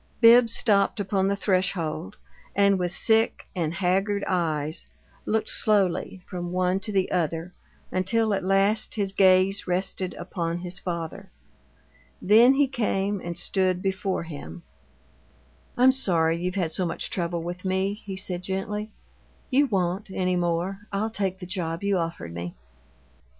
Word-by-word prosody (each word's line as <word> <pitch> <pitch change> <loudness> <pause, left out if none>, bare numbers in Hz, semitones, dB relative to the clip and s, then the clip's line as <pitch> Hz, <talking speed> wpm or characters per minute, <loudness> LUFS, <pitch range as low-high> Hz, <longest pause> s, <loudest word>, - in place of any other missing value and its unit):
Bibbs 230 0 +7
stopped 205 -1 +2
upon 195 -1 0
the 200 - +1
threshold, 185 -4 -1 0.4
and 200 -1 +4
with 175 -1 -1
sick 220 +4 +2
and 165 -2 -1
haggard 195 +2 0
eyes 155 -4 -1 0.4
looked 220 0 0
slowly 190 -3 0
from 175 -1 -5
one 185 +1 +1
to 210 - -5
the 190 -2 0
other 165 0 -1 0.4
until 215 +4 +1
at 195 - -1
last 195 +3 +2
his 200 -3 -1
gaze 190 0 +4
rested 185 0 -2
upon 170 -1 -3
his 180 +1 -3
father. 175 +2 -5 0.9
Then 235 +6 +6
he 285 0 +3
came 205 -6 -1
and 170 0 -5
stood 185 -2 0
before 190 -1 -1
him. 85 - -9 1.1
"I'm 255 +2 +6
sorry 170 -11 +2
you've 180 +1 -2
had 175 -5 -1
so 185 - 0
much 170 - -2
trouble 170 -2 -1
with 175 +2 -6
me," 190 +2 -1
he 195 -2 -6
said, 180 -2 -1
gently. 210 +3 -3 0.6
"You 280 +2 +4
won't, 190 -2 -1
any 185 -1 0
more. 175 +2 -1
I'll 210 +3 -1
take 195 -3 -2
the 185 - -8
job 175 -2 -3
you 200 -2 +1
offered 165 - -4
me." 85 0 -6
190 Hz, 145 wpm, -25 LUFS, 175-200 Hz, 1.1 s, Bibbs